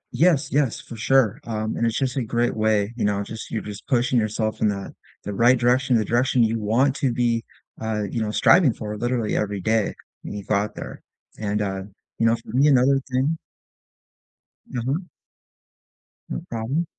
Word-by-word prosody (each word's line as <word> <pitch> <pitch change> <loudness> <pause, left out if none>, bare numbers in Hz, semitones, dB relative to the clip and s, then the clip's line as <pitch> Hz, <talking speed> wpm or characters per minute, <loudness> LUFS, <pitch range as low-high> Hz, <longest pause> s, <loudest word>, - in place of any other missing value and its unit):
Yes, 160 -3 +3
yes, 140 -5 +1
for 120 - -10
sure, 120 -1 +2
uh, 110 -2 -2
and 110 +2 0
it's 115 - -1
just 135 -1 -1
a - - +1
great 120 +2 0
way, 110 -1 +1
you 115 - -3
know, 100 -1 +1
just 110 +2 -8
you're 110 - -3
just 105 -1 -9
pushing 125 -1 +2
yourself 110 0 -2
in - - +4
the 100 -1 -3 0.3
the 105 - -4
right 120 +5 +5
direction, 125 +1 +3
the 110 - 0
direction 120 +1 +2
you 115 0 +1
want 120 +6 +2
to 135 -4 +1
be, 115 -1 +1 0.4
uh, 110 -1 -1
you 115 - -2
know, 110 - -1
striving 140 - +5
for 105 -1 -5
literally 120 0 -1
every 105 -1 -1
day 110 +2 +1 0.3
when - - -7
you 100 - -5
go 105 - -1
out 105 +1 -1
there, - - -8 0.4
and, 105 0 -1
uh, 95 -1 -3 0.4
you 115 - +4
know, 115 - +4
for 115 0 -9
me 140 +3 +5
another 135 0 +4
thing 135 +6 +1 1.3
Mhm. 130 +9 -2 1.2
No 60 - -3
problem. 120 +9 -1
115 Hz, 185 wpm, -23 LUFS, 105-130 Hz, 1.3 s, right